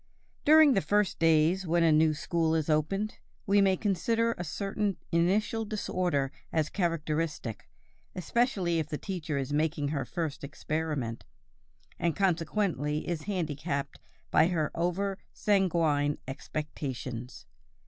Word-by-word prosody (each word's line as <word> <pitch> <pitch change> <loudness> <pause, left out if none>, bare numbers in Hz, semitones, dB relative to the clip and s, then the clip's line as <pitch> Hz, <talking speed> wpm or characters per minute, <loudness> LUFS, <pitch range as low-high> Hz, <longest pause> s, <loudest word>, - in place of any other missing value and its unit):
During 310 -1 +7
the 195 - +2
first 205 0 +1
days 165 +3 +3
when 170 +1 +3
a 165 - +5
new 155 0 +4
school 160 +1 0
is 160 -1 0
opened, 195 +8 0 0.3
we 200 0 +4
may 190 -1 +3
consider 230 +4 +1
a 175 - -5
certain 195 +3 -2
initial 205 +7 +2
disorder 180 -9 -1 0.2
as 155 -2 0
characteristic, 160 - -2 0.5
especially 185 -3 +1
if 155 -1 -3
the 150 - -2
teacher 165 -6 -4
is 135 +1 -2
making 150 -1 0
her 140 -2 -1
first 145 +4 -4
experiment, 150 -5 -3 0.8
and 170 -2 0
consequently 165 -5 0
is 165 -3 -3
handicapped 145 -6 -2 0.3
by 160 - +5
her 160 -4 0
over 190 +3 -1
sanguine 165 -8 +2
expectations. 130 -3 -5
165 Hz, 125 wpm, -29 LUFS, 150-195 Hz, 0.8 s, During